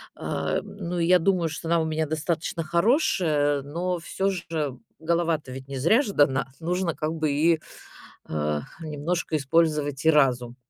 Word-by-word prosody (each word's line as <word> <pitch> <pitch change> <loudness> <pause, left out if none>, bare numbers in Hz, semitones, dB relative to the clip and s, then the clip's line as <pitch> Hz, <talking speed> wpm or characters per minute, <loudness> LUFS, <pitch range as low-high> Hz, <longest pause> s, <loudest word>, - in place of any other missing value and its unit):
А, - - -2
ну, 180 -3 -6
и 165 - +2
я 180 +1 +5
думаю, 175 -2 +1
что 160 +1 -6
она 170 0 +3
у - - -1
меня 160 -1 -1
достаточно 165 +2 -2
хорошая, 170 - +2
но 170 +6 -3
всё 190 +3 -1
же 160 -7 -3 0.2
голова-то 165 -3 0
ведь 130 +1 -8
не 135 0 -5
зря 170 - +4
же 210 -8 -4
дана. 135 -2 +3
Нужно 175 0 -1
как 155 +1 -2
бы 155 -2 0
и, 160 +3 +3 0.7
а, 75 -1 -1 0.2
немножко 160 +2 -2
использовать 150 -1 +1
и 160 - +7
разум. 125 -5 +2
160 Hz, 165 wpm, -25 LUFS, 145-170 Hz, 0.7 s, и